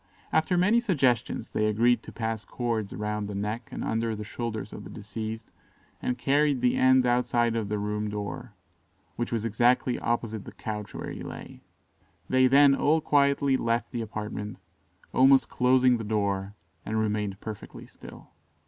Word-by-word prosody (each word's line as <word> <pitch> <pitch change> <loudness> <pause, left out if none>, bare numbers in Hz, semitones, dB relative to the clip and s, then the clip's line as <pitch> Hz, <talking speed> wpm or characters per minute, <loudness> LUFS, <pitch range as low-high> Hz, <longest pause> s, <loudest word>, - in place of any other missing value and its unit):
After 170 +3 +2
many 205 +7 +4
suggestions, 130 - 0
they 110 - 0
agreed 115 +2 +3
to - - -11
pass 110 -1 -3
cords 115 -5 -3
round 105 0 -3
the 100 - -5
neck 105 +4 -3
and - - -5
under 115 0 -1
the 105 - -6
shoulders 110 -1 -5
of - - -8
the - - -10
deceased, 110 +1 -6 0.5
and 125 - -1
carried 145 +1 +2
the 125 0 +2
ends 130 0 +5
outside 120 -1 +2
the 105 -2 -2
room 105 +1 -2
door, 105 +3 -6 0.6
which 120 - -3
was 115 -2 -1
exactly 120 +3 +2
opposite 115 -3 -2
the - - -11
couch 105 -2 -6
where - - -5
he - - -7
lay. - - -9 0.7
They 130 0 +5
then 140 +1 +6
all 150 +3 +3
quietly 140 -2 +2
left 115 0 -1
the 120 - -3
apartment, 105 -1 -5 0.6
almost 135 +1 +5
closing 125 0 +4
the 115 - -5
door, 100 -2 -1 0.3
and 110 - -3
remained 105 -2 -1
perfectly 110 -2 -8
still. - - -14
115 Hz, 160 wpm, -27 LUFS, 105-130 Hz, 0.7 s, then